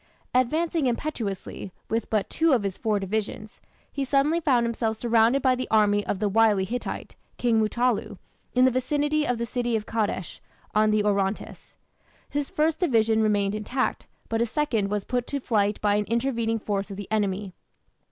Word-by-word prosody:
Advancing 310 +4 +1
impetuously, 230 -7 -4 0.2
with 225 0 -2
but 215 -3 0
two 325 -2 +2
of 235 -5 +2
his 195 -2 -2
four 215 -2 0
divisions, 210 +2 -4 0.3
he 280 - -2
suddenly 280 +5 +2
found 260 -8 +2
himself 225 -1 -1
surrounded 235 +3 +3
by 260 -1 +4
the 255 0 -3
army 205 -1 +3
of - - -1
the 210 +2 0
wily 210 -1 +3
Hittite, 245 +5 -5 0.2
King 230 -2 +2
Mutallu, 220 -2 0 0.4
in 250 +1 +5
the 260 - +4
vicinity 295 +4 0
of 245 - 0
the 235 - -2
city 240 0 -1
of 215 -1 -2
Kadesh, 210 -6 -2 0.3
on 215 0 +4
the 215 0 +2
Orontes. 200 -1 -2 0.5
His 290 -1 -3
first 315 +1 +1
division 225 -9 +3
remained 205 -2 +1
intact, 230 +5 -2 0.2
but 225 - -1
his 235 0 +1
second 225 -8 0
was 205 -1 -1
put 245 +1 -2
to 285 - -2
flight 210 -5 +1
by 205 -1 +3
an 210 - 0
intervening 230 -1 0
force 205 -2 -3
of 195 - -7
the 205 - -6
enemy. 200 -2 -1
225 Hz, 175 wpm, -25 LUFS, 210-255 Hz, 0.5 s, in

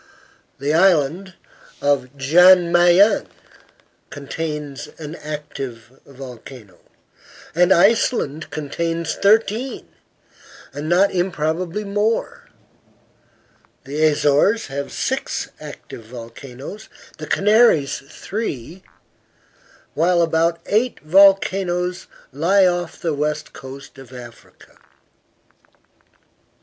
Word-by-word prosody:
The 140 +2 -1
Island 175 +1 +2 0.4
of 140 -1 -1
Jan 175 +5 +5
Mayen 175 +4 +4 0.8
contains 150 -1 -6
an 155 -1 -8
active 135 -5 -8
volcano, 125 -6 -12 0.7
and 180 +2 +3
Iceland 190 - +2
contains 165 +2 -3
thirteen, 225 +5 +1 0.9
and 150 +2 -5
not 185 +3 +3
improbably 175 +2 -2
more; 210 +3 -2 1.3
the 150 +3 -3
Azores 150 +8 +2
have 140 0 -4
six - - -3
active 115 - -11
volcanoes, 125 - -10 0.3
the 155 - -7
Canaries 205 - +3
three; 175 - -6 1.1
while 170 +2 +2
about 165 +1 +1
eight 230 +4 0
volcanoes 180 0 +2 0.2
lie 180 +8 +3
off 175 -1 -1
the 165 -2 -2
west 150 +1 -3
coast 135 0 -11
of 135 -2 -14
Africa. 120 -2 -14
160 Hz, 85 wpm, -20 LUFS, 140-185 Hz, 1.3 s, Jan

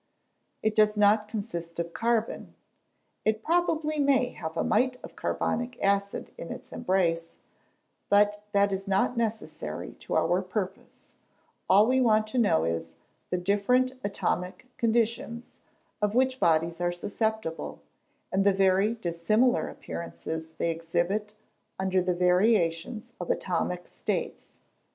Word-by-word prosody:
It 220 - +2
does 215 0 +3
not 210 +1 +4
consist 200 -6 -5
of 170 0 -3
carbon 230 -1 -1 0.7
it 220 +1 0
probably 315 -2 +1
may 275 -3 +3
have 160 0 -6
a - - +1
mite 250 +3 +2
of - - -10
carbonic 245 +1 -2
acid 200 0 0
in 170 - -6
its - - -9
embrace 170 -3 0 0.7
but 205 0 +4
that 200 -1 +3
is 195 +1 -4
not 195 +5 +2
necessary 225 -2 -3
to - - -4
our - - +2
purpose: - - -5 0.6
all 200 +3 +7
we 260 +2 +3
want 215 -3 +4
to 255 - 0
know 200 - +3
is, 80 0 -3 0.3
the 180 - 0
different 205 +8 +2
atomic 190 0 -2
conditions 230 0 0 0.5
of 210 +1 +1
which 260 +1 +2
bodies 165 -1 +2
are 175 0 +1
susceptible, 210 -1 -3 0.5
and 195 +1 +2
the 200 0 +4
very 195 +3 +3
dissimilar 215 +6 +1
appearances 160 -1 -6
they 170 - +1
exhibit 175 +6 -1 0.4
under 190 -1 +1
the 180 0 0
variations 180 +4 +2
of 175 - -5
atomic 180 0 -1
states. - - -3
205 Hz, 130 wpm, -28 LUFS, 175-230 Hz, 0.7 s, all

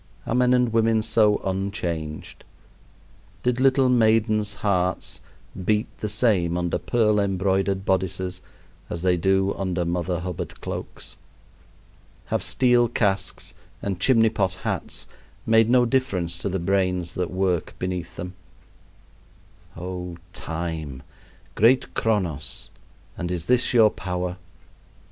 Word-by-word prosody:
Are - - -2
men 125 0 +3
and 125 -2 +2
women 115 -1 +3
so 110 -1 +4
unchanged? 90 -5 -3 1.0
Did 125 0 +1
little 135 0 +4
maidens' 110 -3 +3
hearts 90 -2 0 0.4
beat 105 +3 +2
the 105 - -3
same 100 -6 +2
under 85 -1 -1
pearl 105 -3 +2
embroidered 95 0 0
bodices 95 -1 0 0.5
as 85 - -4
they 90 -1 +3
do 95 +2 +2
under 90 -3 -1
Mother 90 +1 -1
Hubbard 90 -1 -5
cloaks? - - -6 1.2
Have - - +1
steel 125 -2 +3
casques 100 -4 -1 0.3
and 95 -3 -2
chimney 115 +1 +4
pot 95 -3 -1
hats - - -3 0.4
made 115 0 +4
no 125 0 +5
difference 115 -10 0
to 100 - -2
the 95 - -1
brains 90 -1 0
that 90 -1 -2
work 90 -2 -1
beneath 90 -2 -4
them? 90 +1 -6 1.4
Oh, 90 0 -5 0.2
Time! 80 -6 -5 0.5
great 120 +5 +3
Chronos! 90 -10 -1 0.5
and 85 - -2
is 90 -2 -3
this 125 0 +3
your 110 -4 +6
power? 90 0 -3
95 Hz, 120 wpm, -24 LUFS, 90-110 Hz, 1.4 s, your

